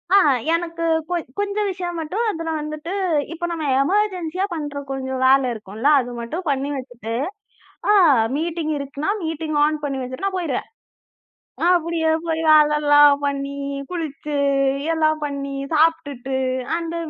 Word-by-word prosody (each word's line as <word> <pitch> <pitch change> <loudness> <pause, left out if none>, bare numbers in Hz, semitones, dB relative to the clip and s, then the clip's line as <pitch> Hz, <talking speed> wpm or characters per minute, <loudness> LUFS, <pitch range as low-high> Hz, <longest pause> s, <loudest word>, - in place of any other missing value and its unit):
அ, - - +9 0.4
எனக்குக் 330 -1 -1
கொஞ் 350 -2 -1
கொஞ்ச 405 0 -1
விஷயம் 355 -2 -4
மட்டும் 365 +9 -2
அதுல 330 -3 -5
வந்துட்டு, 305 +2 -6 0.4
இப்ப 345 +1 -3
நம்ம 330 -2 -3 0.2
எமர்ஜென்சியாப் 370 +1 0
பண்ற 290 -3 -4
கொஞ்சம் 265 -1 -3
வேலை 265 0 +5
இருக்கும்ல்ல. 220 +4 -2
அது 245 0 -7
மட்டும் 315 +11 -5
பண்ணி 275 0 0
வச்சிட்டு, 245 -4 -6 0.8
அ - - +6 0.4
மீட்டிங் 325 0 -2
இருக்குன்னா, 280 +3 -4
மீட்டிங் 320 -1 -3
ஆன் 305 0 -1
பண்ணி 275 -2 -2
வச்சிட்டு 255 +8 -5
நான் 380 -1 -2
போயிருவேன். 310 -8 -3 1.0
அப்படியே 335 -2 +1 0.2
போய் 325 -1 -1
வேலைல்லாம் 295 -1 +6
பண்ணி, 280 0 -2 0.3
குளிச்சு 300 -4 -4 0.6
எல்லாம் 310 -1 +1
பண்ணி, 280 -1 -4 0.2
சாப்பிட்டுட்டு, 285 -5 +1 0.4
அந்த 335 0 -4
310 Hz, 130 wpm, -21 LUFS, 280-335 Hz, 1.0 s, அ